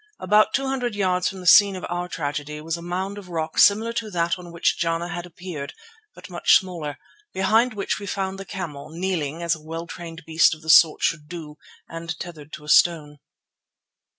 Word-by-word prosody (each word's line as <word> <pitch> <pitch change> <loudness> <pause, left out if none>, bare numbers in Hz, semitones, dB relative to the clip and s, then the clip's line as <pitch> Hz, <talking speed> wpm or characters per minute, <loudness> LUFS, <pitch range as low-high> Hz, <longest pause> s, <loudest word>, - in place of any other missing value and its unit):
About 210 +1 +3
two 275 - 0
hundred 250 -4 -2
yards 185 -2 +1
from 190 -2 -9
the - - -11
scene 200 +2 +7
of 185 - -6
our 175 0 -3
tragedy 145 -1 -4
was 160 +2 -3
a 170 - -8
mound 190 +4 -4
of 190 -3 -13
rock 160 -2 -3
similar 220 +3 +5
to 230 -2 -3
that 170 -2 -1
on 175 -1 -10
which 170 - 0
Jana 165 +1 -1
had 175 +1 -5
appeared, 170 -5 -8 0.4
but - - -12
much - - +4
smaller, 170 -6 -6 0.4
behind 220 +5 +2
which 200 +1 -2
we 200 - -7
found 195 -1 -3
the - - -5
camel, 165 -7 -7
kneeling 165 -2 -3
as 170 0 +2
a 155 - -7
well 165 +2 -6
trained 165 -1 -9
beast 160 0 +4
of 155 - -18
the 160 - +3
sort 160 -1 +6
should 150 -3 0
do 155 -3 -9 0.3
and 165 -1 -6
tethered 155 -4 -9
to 150 - -8
a - - -13
stone. 150 -3 +3
170 Hz, 205 wpm, -23 LUFS, 160-190 Hz, 0.4 s, scene